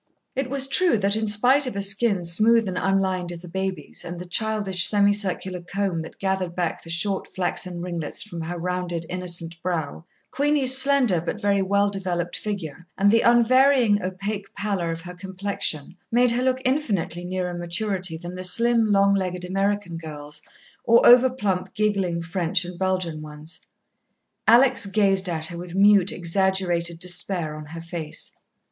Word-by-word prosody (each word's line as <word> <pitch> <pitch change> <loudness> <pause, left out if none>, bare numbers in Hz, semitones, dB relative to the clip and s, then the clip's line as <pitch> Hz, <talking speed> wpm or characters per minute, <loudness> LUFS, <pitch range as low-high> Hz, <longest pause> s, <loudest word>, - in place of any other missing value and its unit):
It 265 0 -2
was 270 0 +1
true 335 +1 +4
that, 200 0 0
in 220 0 -2
spite 250 +7 +4
of 250 - -5
a 200 - -2
skin 200 -2 +2
smooth 215 +6 +3
and 185 - -4
unlined 190 -1 -1
as 170 0 -9
a - - -10
baby's 190 +2 -5
and 175 0 -7
the 180 - -8
childish, 200 -2 +3
semicircular 200 -3 0
comb 185 -1 -3
that 160 - -11
gathered 190 -3 -3
back 175 -2 -3
the 165 - -13
short 190 +4 0
flaxen 180 -1 -4
ringlets 170 -4 -4
from 170 -6 -8
her 170 +2 -5
rounded, 175 -1 -4
innocent 170 -2 -5
brow, 165 -4 -4 0.3
Queenie's 280 -1 +5
slender, 265 - +3
but 180 +5 -5
very 200 -2 0
well 200 +1 +1
developed 180 -3 -3
figure 180 -5 -6
and 200 +1 +3
the 230 +1 +3
unvarying 240 -2 +3
opaque 195 +2 -5
pallor 195 -5 -3
of 165 0 -5
her 180 +1 -10
complexion, 190 -4 -3 0.2
made 245 +1 +3
her 240 +1 -1
look 260 0 -1
infinitely 205 - -2
nearer 180 0 -4
maturity 175 0 -2
than 175 +2 -9
the 185 0 -7
slim, 230 +4 +3
long 200 -1 +3
legged 180 -2 -3
American 195 -1 -2
girls, 150 -2 -9 0.4
or 235 0 +4
over 250 +2 +7
plump, 200 -8 -4
giggling 195 -5 -1
French 175 +1 0
and 175 0 -9
Belgian 185 -4 -2
ones. 150 +1 -8 0.8
Alex 245 -1 +4
gazed 195 -2 +2
at 160 -2 -2
her 170 0 -5
with 175 0 -8
mute, 200 -1 +4
exaggerated 175 -1 0
despair 175 -2 +4
on 155 -1 -10
her 165 +2 -9
face. 165 -2 -2
190 Hz, 165 wpm, -23 LUFS, 175-210 Hz, 0.8 s, over